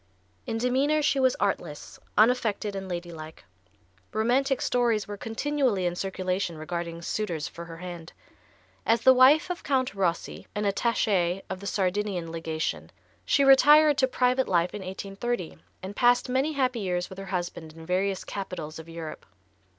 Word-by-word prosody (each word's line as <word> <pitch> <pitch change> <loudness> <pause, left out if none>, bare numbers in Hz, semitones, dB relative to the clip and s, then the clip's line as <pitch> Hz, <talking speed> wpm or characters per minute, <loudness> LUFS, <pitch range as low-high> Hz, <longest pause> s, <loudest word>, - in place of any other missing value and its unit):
In 225 - -2
demeanor 270 +6 +1
she 280 - +2
was 260 -1 +3
artless, 175 -7 -3 0.2
unaffected 215 -3 +2
and 190 -1 -5
ladylike. 170 - -7 0.7
Romantic 255 +5 +1
stories 235 -4 +1
were 205 - -5
continually 230 -2 -1
in 175 0 0
circulation 185 -2 -2
regarding 170 +1 -5
suitors 170 -7 -2
for 170 - -9
her 165 -1 -9
hand. 175 -1 -8 0.7
As 230 0 +2
the 260 +2 +7
wife 280 +7 +5
of 355 - -5
Count 260 -5 0
Rossi, 185 -4 -2
an 210 - -1
attaché 195 -3 +1
of 190 - -4
the 200 - -7
Sardinian 190 -3 -1
legation, 160 -1 -3 0.4
she 280 - +3
retired 295 +2 +7
to 260 - +4
private 255 0 +1
life 175 -1 +1
in 210 - -5
1830, 195 +1 -4 0.2
and 195 +2 -6
passed 245 +2 +3
many 265 +5 +1
happy 255 -4 0
years 180 -3 -1
with 190 - -8
her 195 - -6
husband 175 -4 -4
in 165 0 -12
various 190 +2 0
capitols 170 -6 -6
of 160 +1 -11
Europe. 165 -2 -7
200 Hz, 155 wpm, -27 LUFS, 175-250 Hz, 0.7 s, the